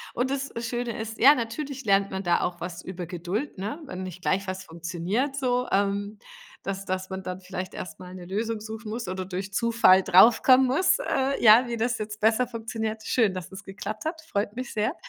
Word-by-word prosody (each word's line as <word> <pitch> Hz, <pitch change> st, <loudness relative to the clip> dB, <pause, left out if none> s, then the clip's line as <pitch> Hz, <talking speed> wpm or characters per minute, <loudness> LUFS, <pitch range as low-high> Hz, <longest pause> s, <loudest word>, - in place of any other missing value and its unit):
nnd 250 Hz, +2 st, 0 dB
das 275 Hz, 0 st, -2 dB
Schöne 240 Hz, 0 st, -3 dB
ist, 220 Hz, 0 st, -6 dB
ja, 280 Hz, +5 st, +8 dB
natürlich 270 Hz, +3 st, -4 dB
lernt 200 Hz, -1 st, +3 dB
man 190 Hz, 0 st, -3 dB
da 175 Hz, -, +2 dB
auch 175 Hz, -1 st, -2 dB
was 175 Hz, 0 st, -5 dB
über 180 Hz, -1 st, -6 dB
Geduld, 180 Hz, -, -4 dB
ne? 215 Hz, -, -4 dB
Wenn 185 Hz, -7 st, -6 dB
nicht 185 Hz, -1 st, -8 dB
gleich 195 Hz, +2 st, 0 dB
was 185 Hz, +1 st, -4 dB
funktioniert 175 Hz, -, -2 dB
so, 250 Hz, -2 st, 0 dB
ähm, 200 Hz, +1 st, 0 dB, 0.5 s
dass 195 Hz, 0 st, -4 dB
dass 185 Hz, 0 st, -3 dB
man 190 Hz, 0 st, -5 dB
dann 185 Hz, 0 st, -5 dB
vielleicht 185 Hz, 0 st, -6 dB
erst 160 Hz, -3 st, -7 dB
mal 180 Hz, 0 st, -10 dB
'ne 180 Hz, -, -9 dB
Lösung 220 Hz, +4 st, -2 dB
suchen 220 Hz, 0 st, -7 dB
muss 230 Hz, 0 st, -4 dB
oder 185 Hz, +1 st, -3 dB
durch 190 Hz, +2 st, -5 dB
Zufall 230 Hz, -4 st, +5 dB
draufkommen 240 Hz, +7 st, +6 dB
muss, 315 Hz, +9 st, +3 dB
äh, 275 Hz, -, 0 dB
ja, 230 Hz, +3 st, +8 dB
wie 235 Hz, -, -3 dB
das 235 Hz, +1 st, 0 dB
jetzt 215 Hz, 0 st, -6 dB
besser 225 Hz, +3 st, +3 dB
funktioniert. 225 Hz, -2 st, -4 dB
Schön, 220 Hz, -6 st, +2 dB
dass 185 Hz, -1 st, -7 dB
es 190 Hz, 0 st, -9 dB
geklappt 205 Hz, +4 st, -6 dB
hat, 320 Hz, 0 st, -3 dB
freut 210 Hz, -9 st, -3 dB
mich 255 Hz, 0 st, -5 dB
sehr. 215 Hz, +9 st, 0 dB
215 Hz, 205 wpm, -26 LUFS, 185-240 Hz, 0.5 s, ja